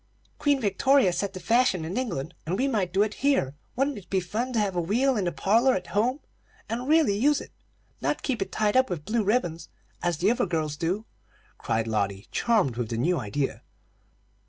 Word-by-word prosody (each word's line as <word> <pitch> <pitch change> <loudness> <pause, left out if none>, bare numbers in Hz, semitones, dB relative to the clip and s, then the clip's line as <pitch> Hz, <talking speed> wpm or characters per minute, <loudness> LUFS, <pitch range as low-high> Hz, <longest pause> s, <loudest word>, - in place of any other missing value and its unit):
"Queen 285 -2 +2
Victoria 215 0 +3
set 200 +2 -2
the 185 - -6
fashion 225 -6 +2
in 170 - -4
England, 175 - -3
and 180 +4 -1
we 265 - +1
might 205 -9 0
do 195 +3 +3
it 215 0 -2
here. 270 - +2 0.2
Wouldn't 270 -2 0
it 195 - -18
be 190 - +2
fun 220 +8 -3
to 230 - +2
have 200 -3 0
a 175 - +1
wheel 245 +10 +2
in 205 -4 0
the 175 - 0
parlor 230 +9 +3
at 185 - -3
home, 245 +8 +1 0.5
and 245 +3 -3
really 310 -9 +4
use 285 +7 +3
it; - - -10 0.5
not - - -1
keep 250 -7 -1
it 195 - -2
tied 210 0 +1
up 260 0 +4
with 165 -5 -4
blue 225 0 0
ribbons, 175 -7 -1 0.3
as 175 -2 0
the 190 +7 +3
other 235 - 0
girls 155 -3 -1
do!" 180 +7 -2 0.5
cried 110 0 -1
Lotty, 100 -3 -2
charmed 205 - +1
with 120 -3 -2
the 115 - -2
new 170 +7 +1
idea. 135 +5 -2
200 Hz, 205 wpm, -26 LUFS, 170-245 Hz, 0.5 s, really